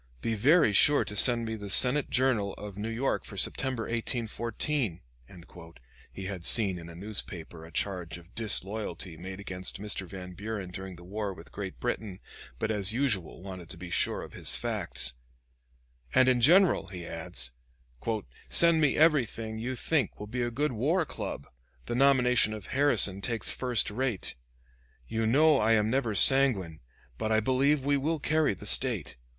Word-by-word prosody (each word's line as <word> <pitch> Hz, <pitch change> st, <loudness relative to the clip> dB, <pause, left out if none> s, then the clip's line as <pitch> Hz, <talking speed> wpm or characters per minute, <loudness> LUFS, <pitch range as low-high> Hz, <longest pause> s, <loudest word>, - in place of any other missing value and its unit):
Be 115 Hz, -, -2 dB
very 130 Hz, -, +4 dB
sure 145 Hz, +8 st, +5 dB
to 105 Hz, -, -4 dB
send 120 Hz, +2 st, +3 dB
me 110 Hz, -, -4 dB
the 105 Hz, -2 st, -7 dB
Senate 130 Hz, +7 st, +4 dB
Journal 120 Hz, -6 st, +1 dB
of 105 Hz, -1 st, -9 dB
New 105 Hz, +3 st, -4 dB
York 120 Hz, +4 st, -1 dB
for -, -, -10 dB
September, 130 Hz, -4 st, -1 dB
1814," 115 Hz, -, -2 dB, 1.1 s
he 95 Hz, -, -8 dB
had 95 Hz, -3 st, -6 dB
seen 95 Hz, -2 st, +5 dB
in 85 Hz, 0 st, -10 dB
a 85 Hz, -, -11 dB
newspaper 90 Hz, -4 st, -5 dB
a 80 Hz, -, -12 dB
charge 90 Hz, -4 st, -3 dB
of 85 Hz, +1 st, -17 dB
disloyalty 100 Hz, -5 st, 0 dB
made 95 Hz, +3 st, -8 dB
against 95 Hz, -2 st, -2 dB
Mr. 100 Hz, -2 st, -5 dB
Van 90 Hz, -1 st, -9 dB
Buren 100 Hz, -1 st, -6 dB
during 95 Hz, +1 st, -7 dB
the 85 Hz, -, -14 dB
war 100 Hz, +1 st, -4 dB
with 80 Hz, -, -14 dB
Great 100 Hz, -2 st, -7 dB
Britain, 110 Hz, -5 st, -4 dB, 0.4 s
but, 110 Hz, -, -2 dB
as 105 Hz, -1 st, +1 dB
usual, 110 Hz, -, -2 dB
wanted 95 Hz, -3 st, -9 dB
to 95 Hz, -, -8 dB
be 90 Hz, 0 st, -9 dB
sure -, -, 0 dB
of -, -, -11 dB
his -, -, +2 dB
facts, -, -, -1 dB, 1.0 s
"and 130 Hz, 0 st, +5 dB
in 125 Hz, -2 st, +3 dB
general," 175 Hz, +7 st, +4 dB
he 90 Hz, -3 st, -8 dB
adds, -, -, -6 dB, 1.0 s
"send 170 Hz, -1 st, +4 dB
me 150 Hz, -3 st, +2 dB
everything 115 Hz, -8 st, +1 dB
you 125 Hz, +3 st, -3 dB
think 140 Hz, -2 st, -1 dB
will 105 Hz, -, -6 dB
be 120 Hz, +4 st, -4 dB
a 120 Hz, -, 0 dB
good 145 Hz, +5 st, -1 dB
war 150 Hz, -, 0 dB
club, 70 Hz, -, -6 dB, 0.4 s
The -, -, -4 dB
nomination 125 Hz, -4 st, +3 dB
of 105 Hz, -4 st, -9 dB
Harrison 130 Hz, -8 st, +2 dB
takes 115 Hz, +2 st, 0 dB
first 125 Hz, -5 st, 0 dB
rate. 120 Hz, -3 st, -3 dB, 0.7 s
You 110 Hz, 0 st, -1 dB
know 150 Hz, +5 st, +4 dB
I 110 Hz, +1 st, +3 dB
am 110 Hz, 0 st, +2 dB
never 120 Hz, -5 st, 0 dB
sanguine; 110 Hz, -, +5 dB, 0.4 s
but 110 Hz, -, -2 dB
I 110 Hz, -, +4 dB
believe 135 Hz, +4 st, +1 dB
we 145 Hz, 0 st, +2 dB
will 155 Hz, +4 st, -1 dB
carry 155 Hz, -6 st, +1 dB
the -, -, -12 dB
State. -, -, +3 dB
110 Hz, 170 wpm, -28 LUFS, 95-130 Hz, 1.1 s, sure